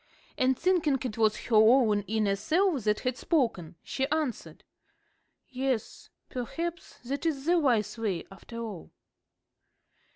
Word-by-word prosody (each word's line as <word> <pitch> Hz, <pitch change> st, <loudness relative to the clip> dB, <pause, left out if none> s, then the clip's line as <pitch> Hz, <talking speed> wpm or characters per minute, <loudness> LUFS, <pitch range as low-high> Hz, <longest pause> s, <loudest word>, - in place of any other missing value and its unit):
And 260 Hz, 0 st, +2 dB
thinking 330 Hz, -6 st, +2 dB
it 230 Hz, -3 st, -4 dB
was 215 Hz, -1 st, +3 dB
her 230 Hz, -, 0 dB
own 220 Hz, -1 st, +5 dB
inner 210 Hz, -1 st, +1 dB
self 310 Hz, -, +1 dB
that 210 Hz, 0 st, +1 dB
had 255 Hz, -1 st, -1 dB
spoken, 225 Hz, -, 0 dB
she 265 Hz, 0 st, -2 dB
answered, 305 Hz, -5 st, -3 dB, 0.8 s
"Yes, 260 Hz, -3 st, -3 dB, 0.2 s
perhaps 330 Hz, +7 st, -5 dB
that 275 Hz, +5 st, -3 dB
is 295 Hz, -5 st, -1 dB
the 345 Hz, +1 st, +4 dB
wise 235 Hz, -7 st, +1 dB
way 195 Hz, -7 st, -2 dB
after 195 Hz, +4 st, -11 dB
all." 220 Hz, -7 st, -6 dB
250 Hz, 130 wpm, -29 LUFS, 215-295 Hz, 0.8 s, own